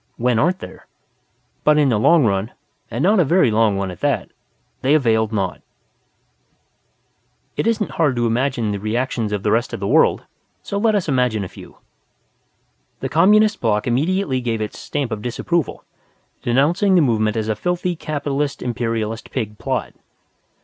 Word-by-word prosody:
When 120 -1 +1
aren't 175 +7 +2
there? - - -11 0.8
But 150 0 +4
in 145 -2 +4
the 110 -4 +2
long 160 +5 +5
run, 100 +1 -1 0.4
and 120 +6 -3
not 205 +2 +4
a - - +6
very 165 -4 +3
long 110 -2 +2
one 95 -1 -2
at 90 - -11
that, - - -1 0.5
they 140 +4 +3
availed 110 -6 +2
naught. 95 -4 -2 1.9
It - - -1
isn't 225 -3 0
hard 150 -6 +1
to 120 0 0
imagine 120 -1 0
the 100 - -3
reactions 110 +1 -2
of 105 -1 -2
the 105 - +1
rest 115 +2 0
of - - -4
the 100 - -3
world. - - +3 0.4
So 200 - -3
let 220 0 +2
us 195 -4 0
imagine 125 -7 +1
a - - -5
few. - - -14 1.2
The - - -3
Communist 210 +6 +4
Block 105 -3 +1
immediately 140 +2 0
gave 115 -2 -2
its 105 -1 -5
Stamp 140 -5 -3
of 110 -2 -3
Disapproval, 145 +7 -2 0.6
denouncing 165 +11 +2
the 175 - +5
movement 110 -5 +1
as 110 -1 -2
a 110 - 0
filthy 180 - -2
Capitalist 145 -2 -3
Imperialist 115 -2 -3
Pig 105 -5 -4
plot. 130 -8 -3
125 Hz, 165 wpm, -20 LUFS, 110-155 Hz, 1.9 s, a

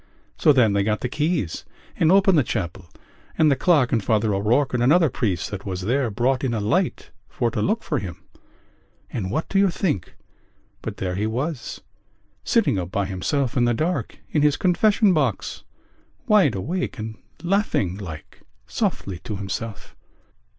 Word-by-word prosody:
So 150 - +4
then 120 -7 +4
they 100 - +2
got 105 +1 0
the - - -1
keys 145 - -1 0.3
and 165 0 +3
opened 195 -1 +5
the 150 - +5
chapel 90 -5 -4 0.5
and 155 -2 +5
the - - +4
clerk 145 -6 +3
and 115 -4 +1
Father 110 0 +1
O'Rourke 115 +8 +1
and 125 - +1
another 155 +4 +4
priest 100 -9 -1
that 100 -1 -5
was 95 -2 -4
there 125 +6 0
brought 125 +5 0
in 120 -3 0
a - - -1
light 165 - -1 0.2
for 120 -4 -1
to - - -2
look 220 +3 0
for 150 - -1
him.... 90 -6 -8 0.9
And 95 -6 -2
what 155 +11 -2
do 195 - +1
you 200 -1 +4
think 165 - -2 0.7
but - - -6
there 90 -1 -2
he 105 +4 -1
was, 130 +5 -3 0.6
sitting 200 - +2
up 90 -1 -4
by 100 +1 -1
himself 120 +9 -1
in 125 -2 +3
the 120 -1 +2
dark 170 +8 -2
in 150 - +2
his 150 -1 +3
confession 200 +2 +3
box, 135 - -1 0.6
wide 195 - +4
awake 165 - -3
and 110 0 -6 0.2
laughing 175 - +1
like 80 -7 -9 0.2
softly 95 -3 -2
to 105 - -6
himself?" 100 +2 -6
120 Hz, 170 wpm, -23 LUFS, 100-160 Hz, 0.9 s, opened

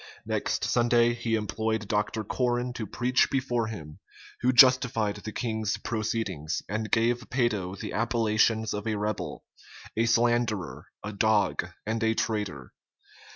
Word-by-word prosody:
Next - - -1
Sunday 120 0 +3
he 115 -1 -1
employed 110 0 -2
Dr. 105 +1 -1
Corren 120 +2 -1
to 110 -4 -5
preach 125 +5 +2
before 125 -4 0
him; 80 -9 -8 0.4
who 125 - +3
justified 125 -4 +5
the 110 - -7
king's 110 -3 -2
proceedings, 110 -8 -3
and 110 +1 -3
gave 115 +1 +1
Peyto 105 -7 0
the - - -5
appellations 110 -1 +1
of 105 +2 -4
a 110 - 0
rebel, 105 0 -3 0.5
a 115 +1 +2
slanderer, 115 -5 +1 0.2
a 105 - -5
dog, 105 -1 +2 0.2
and 110 +2 -2
a 110 0 +2
traitor. 100 - -3
110 Hz, 135 wpm, -27 LUFS, 105-120 Hz, 0.5 s, justified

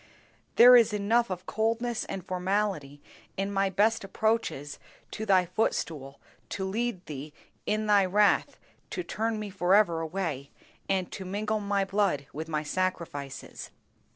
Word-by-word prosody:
There 250 +2 +9
is 230 -3 +5
enough 220 +3 +2
of 185 0 -5
coldness 230 +2 -1
and 190 -2 -6
formality 185 -6 -2 0.3
in 195 +1 -1
my 195 0 +2
best 210 +4 +2
approaches 195 -8 -1 0.3
to 220 - -5
Thy 185 -2 +4
footstool 150 -7 -2 0.3
to 190 - -3
lead 205 -1 -2
Thee 145 0 -7 0.3
in 215 +1 0
Thy 205 -2 +4
wrath 205 +2 +2 0.3
to 360 - -4
spurn 225 -6 -2
me 210 -1 -5
forever 185 -2 +3
away, 160 -5 -3 0.4
and 190 -2 0
to 190 - -6
mingle 210 +3 -2
my 200 -1 0
blood 195 -7 0
with 160 +2 -6
my 155 -1 -1
sacrifices! 160 -5 -4
195 Hz, 140 wpm, -28 LUFS, 170-215 Hz, 0.4 s, There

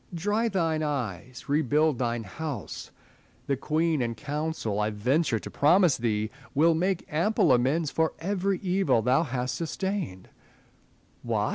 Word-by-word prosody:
Dry 210 +7 0
thine 165 -6 0
eyes; 125 - -4
rebuild 150 -1 +2
thine 120 -2 -1
house: 135 +3 -6 0.6
the 140 - 0
Queen 155 +2 0
and 115 -2 -2
Council, 150 -7 -3
I 105 0 +1
venture 125 +6 +1
to - - -8
promise 170 +1 +4
thee, 110 -2 -1 0.2
will 165 +4 +5
make 185 +3 0
ample 170 -2 +3
amends 135 +5 +1
for 160 0 +1
every 195 +3 -1
evil 185 - +2
thou 130 +5 +3
hast 125 -4 -2
sustained. 165 - -3 0.9
What - - 0
150 Hz, 135 wpm, -27 LUFS, 125-170 Hz, 0.9 s, will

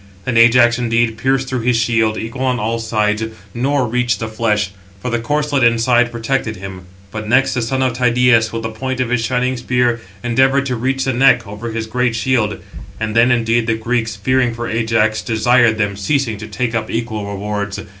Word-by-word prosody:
Then 125 - -1
Ajax, 120 +1 +5
indeed, 115 -1 +1
pierced 130 +3 0
through 130 -1 -2
his 120 0 +1
shield, 110 -2 +1
equal 115 +4 -6
on 125 -1 0
all 115 +1 -1
sides, 105 -1 0 0.3
nor 135 +2 0
reached 120 0 0
the 110 - -3
flesh; 105 -3 -1 0.3
for 125 +5 -4
the 120 - 0
corslet 145 +2 0
inside 120 +1 +3
protected 115 -1 -2
him. 95 -2 -9 0.2
But 110 -1 -6
next 135 +2 +3
the 125 - -1
son 130 +3 -1
of 130 -2 0
Tydeus, 120 -2 +3
with 115 0 -4
the 110 - -3
point 130 +3 -4
of 125 -2 -1
his 125 -2 +1
shining 125 +1 0
spear, 120 -1 0 0.2
endeavoured 135 +3 +2
to 130 -2 -2
reach 130 +3 -1
the 135 - 0
neck, 125 -1 +4
over 105 +3 -7
his 110 0 -3
great 120 +1 -1
shield. 115 -3 0 0.4
And 110 0 -3
then, 115 +2 +5
indeed, 115 -1 +1
the 115 - +1
Greeks, 115 -1 -2
fearing 125 +3 0
for 120 0 -4
Ajax, 110 -1 +1
desired 120 0 +2
them, 100 -2 -1
ceasing, 115 +1 -1
to 110 - -7
take 120 +2 -3
up 110 -1 -2
equal 115 -2 -3
rewards. 100 0 -4
115 Hz, 195 wpm, -17 LUFS, 110-125 Hz, 0.4 s, Ajax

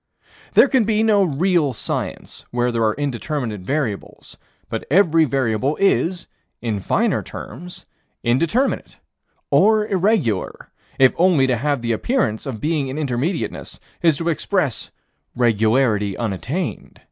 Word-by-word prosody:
There - - +7
can 260 -3 +3
be 215 0 +1
no 210 -3 +4
real 165 -2 +1
science 110 - -5
where 120 0 0
there 115 -1 0
are 110 -1 +2
indeterminate 135 -5 -3
variables, 120 -2 -4 0.3
but - - -4
every 165 -1 +4
variable 130 0 0
is, 185 -1 +1 0.3
in 110 -4 -2
finer - - +1
terms, 180 +1 -9 0.4
indeterminate, 170 - 0 0.5
or 215 0 +4
irregular, 190 - 0 0.3
if 130 -1 +5
only 170 -6 +4
to 130 -1 +1
have 140 +1 -1
the 115 - 0
appearance 125 - -1
of 120 -5 -5
being 150 -1 -1
in 130 +2 -5
Intermediateness 150 +4 -3 0.2
is 165 -4 +3
to 170 0 -1
express 165 - -1 0.5
regularity 110 -3 +2
unattained. 125 - -4
140 Hz, 125 wpm, -21 LUFS, 120-180 Hz, 0.5 s, There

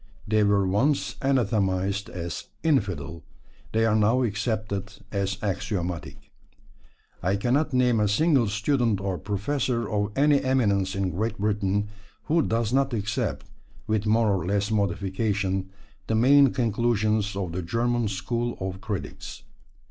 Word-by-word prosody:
They 110 0 +3
were 100 -2 +3
once 130 +10 +1
anathematised 100 -7 0
as 85 -2 -5 0.2
"infidel"; 95 - 0 0.5
they 110 0 +2
are 110 -1 +3
now 110 +4 +3
accepted 105 -2 -2 0.2
as 100 -1 -1
axiomatic. 90 -4 -3 0.9
I 95 +3 +1
cannot 130 +9 +1
name 125 -3 +3
a 105 - +3
single 135 +2 +3
student 110 +1 +1
or 95 -2 -3
professor 115 +4 -1
of 105 0 -1
any 145 0 +4
eminence 100 -8 +1
in 95 -1 -1
Great 110 +7 -2
Britain 105 0 0 0.3
who 165 +2 +2
does 115 -3 0
not 135 -2 +2
accept, 105 -1 -2 0.4
with 110 -1 0
more 110 0 +3
or 95 -4 -1
less 100 +2 0
modification, 100 -1 -1 0.4
the 110 - +1
main 135 +3 +6
conclusions 110 -3 0
of 95 -4 -3
the 90 +2 -3
German 115 +6 0
school 120 +5 -2
of 95 0 -4
critics. 100 -5 -6
105 Hz, 135 wpm, -26 LUFS, 100-120 Hz, 0.9 s, main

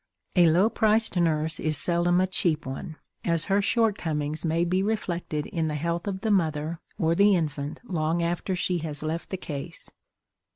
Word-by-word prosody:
A 175 -2 +6
low 180 +6 +4
priced 220 -1 +2
nurse 160 -2 +1
is 155 -2 0
seldom 175 +3 +3
a 185 - +3
cheap 170 -5 0
one, 135 +4 -6 0.3
as 165 -2 +1
her 200 +1 +2
shortcomings 160 -10 0
may 165 +1 +1
be 185 +2 +1
reflected 175 -7 -2
in 165 -2 -2
the 150 - -2
health 170 +4 -2
of 190 -1 -3
the 220 - 0
mother 160 -3 0 0.2
or 165 -4 +2
the 200 +3 +5
infant 150 -3 -3
long 165 -2 0
after 175 +2 -1
she 180 0 0
has 150 -2 -3
left 160 +2 -3
the 190 - -3
case. 155 0 -6
170 Hz, 175 wpm, -26 LUFS, 155-185 Hz, 0.3 s, A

